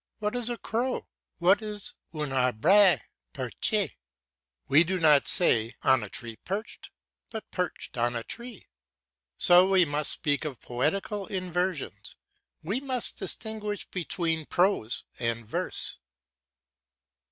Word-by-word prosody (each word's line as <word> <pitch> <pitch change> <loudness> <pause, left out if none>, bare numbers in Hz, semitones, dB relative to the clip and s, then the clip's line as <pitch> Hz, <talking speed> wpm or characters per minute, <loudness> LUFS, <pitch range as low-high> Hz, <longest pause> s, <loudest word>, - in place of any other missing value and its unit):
What 210 +2 -2
is 245 -1 +1
a 240 - -3
crow? 245 +4 -2 0.3
What 190 +4 +4
is 210 -2 -3 0.2
"un 150 -3 -4
arbre 150 - +4 0.3
perche"? - - -1 0.7
We 150 +4 +6
do 185 +2 -2
not 150 -4 +5
say 120 - +3
"on 130 -2 +4
a 105 - -6
tree 115 +1 -7
perched," 200 - -6 0.4
but 220 -2 -8
perched 180 -1 -4
on 120 +1 +1
a 115 - -3
tree. 235 - -8 0.7
So 180 +2 +6
we 190 -2 +5
must 145 0 +2
speak 145 -2 0
of 145 -6 -5
poetical 190 - -2
inversions, 180 -4 -3 0.5
we 200 +10 -1
must 260 -3 +1
distinguish 210 +1 -2
between 165 -3 -2
prose 175 - +1 0.2
and 115 -1 -1
verse. - - -1
180 Hz, 125 wpm, -27 LUFS, 140-205 Hz, 0.7 s, We